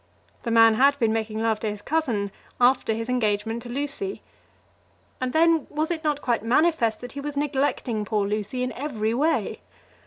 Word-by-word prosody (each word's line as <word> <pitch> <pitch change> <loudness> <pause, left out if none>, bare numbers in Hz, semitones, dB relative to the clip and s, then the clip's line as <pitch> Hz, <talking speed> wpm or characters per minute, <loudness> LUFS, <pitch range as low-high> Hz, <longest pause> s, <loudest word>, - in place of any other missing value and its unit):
The 235 - -4
man 225 -1 +6
had 275 +5 +4
been 225 -5 +2
making 220 0 -2
love 220 -1 +1
to 220 - -2
his 205 0 -7
cousin 235 -11 -1 0.3
after 245 -1 +3
his 225 +1 -2
engagement 225 -2 0
to 240 - -9
Lucy. 290 +10 -3 1.0
And 255 0 -1
then, 325 +1 +3
was 310 +3 -1
it 330 -1 -3
not 295 -2 -1
quite 240 -4 +1
manifest 240 -3 +2
that 245 - -7
he 280 - -6
was 290 0 -5
neglecting 270 -6 0
poor 210 -1 0
Lucy 210 +4 -2
in 255 - -2
every 230 -5 -2
way? 310 +6 0
245 Hz, 180 wpm, -25 LUFS, 220-290 Hz, 1.0 s, man